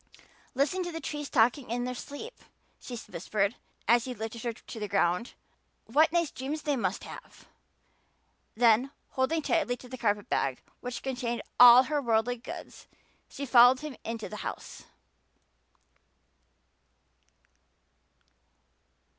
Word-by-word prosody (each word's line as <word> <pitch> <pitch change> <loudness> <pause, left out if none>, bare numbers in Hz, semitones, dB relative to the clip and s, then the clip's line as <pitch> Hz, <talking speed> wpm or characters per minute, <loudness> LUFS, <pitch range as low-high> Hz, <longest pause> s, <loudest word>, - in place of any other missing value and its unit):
"Listen 285 +8 +1
to 350 -1 -3
the 325 - -5
trees 295 -1 -5
talking 245 +2 +2
in 240 +1 -1
their 250 0 -3
sleep," 285 - -8 0.5
she 245 - -7
whispered, 200 +4 -1 0.3
as 235 0 +4
he 255 -1 -5
lifted 225 +1 -6
her 235 - -2
to 225 0 -10
the 210 - -3
ground. 190 +2 0 0.5
"What 305 +8 +3
nice 340 -3 +1
dreams 290 +4 -5
they 290 -2 +1
must 240 - -2
have!" - - -12 1.1
Then, 235 +3 +4 0.2
holding 290 +4 0
tightly 300 -8 +1
to 250 - -13
the 255 0 -8
carpet 205 -3 0
bag 135 -2 -1 0.2
which 250 0 -6
contained 245 -3 -3 0.2
"all 245 +1 +10
her 290 +2 -1
worldly 235 0 +1
goods," 235 - -10 0.4
she 280 - -6
followed 250 0 +6
him 300 -3 -6
into 225 -1 -5
the 210 - -8
house. - - -7
245 Hz, 130 wpm, -29 LUFS, 230-280 Hz, 1.1 s, all